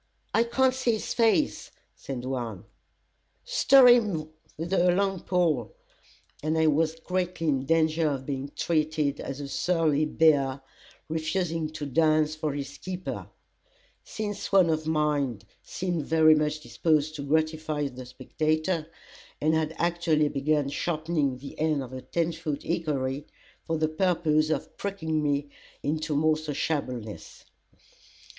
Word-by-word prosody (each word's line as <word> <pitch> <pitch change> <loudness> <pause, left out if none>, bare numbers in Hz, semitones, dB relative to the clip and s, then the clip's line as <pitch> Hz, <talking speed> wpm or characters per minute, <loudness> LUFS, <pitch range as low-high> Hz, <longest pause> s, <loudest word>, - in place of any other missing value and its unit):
"I 230 - +3
can't 260 +2 +2
see 255 -2 +1
his 220 - -3
face," 235 +6 +2 0.3
said 130 -2 -6
one. 120 -7 -4 0.8
"Stir 275 - +6
him 210 -11 +4 0.3
with 170 +4 -4
a 180 -1 +4
long 195 0 +1
pole!" 175 - 0 0.7
and 155 +1 0
I 160 - +3
was 155 +1 +2
greatly 180 -1 -2
in 135 -2 0
danger 160 0 +2
of 135 -2 -3
being 140 0 -4
treated 155 -3 0
as 135 +1 -5
a 140 - -5
surly 155 -1 +1
bear, 145 -4 +3 0.5
refusing 160 0 -1
to 155 -1 -5
dance 155 +2 +2
for 155 -1 -2
his 140 -1 -6
keeper; 185 0 -5 0.8
since 205 -2 -5
one 185 -4 +5
of 155 0 -2
mine 145 -8 0 0.2
seemed 175 -5 -3
very 160 -1 +6
much 150 0 0
disposed 150 +4 +1
to - - -5
gratify 155 0 0
the 130 -1 -9
spectator, 155 +5 -1 0.5
and 155 +1 +2
had 160 0 0
actually 170 -3 +1
begun 145 0 0
sharpening 155 -3 -1
the 140 +2 -10
end 155 -3 +1
of 130 0 -10
a 130 - -6
ten 170 +3 -1
foot 155 -3 -4
hickory, 145 -4 -2 0.4
for 165 - 0
the 155 0 +1
purpose 155 -2 +1
of 155 -3 -2
pricking 160 -6 -2
me 145 -1 -1 0.3
into 155 +1 -1
more 155 +1 +3
sociableness. 140 -7 -4
155 Hz, 135 wpm, -27 LUFS, 145-170 Hz, 0.8 s, Stir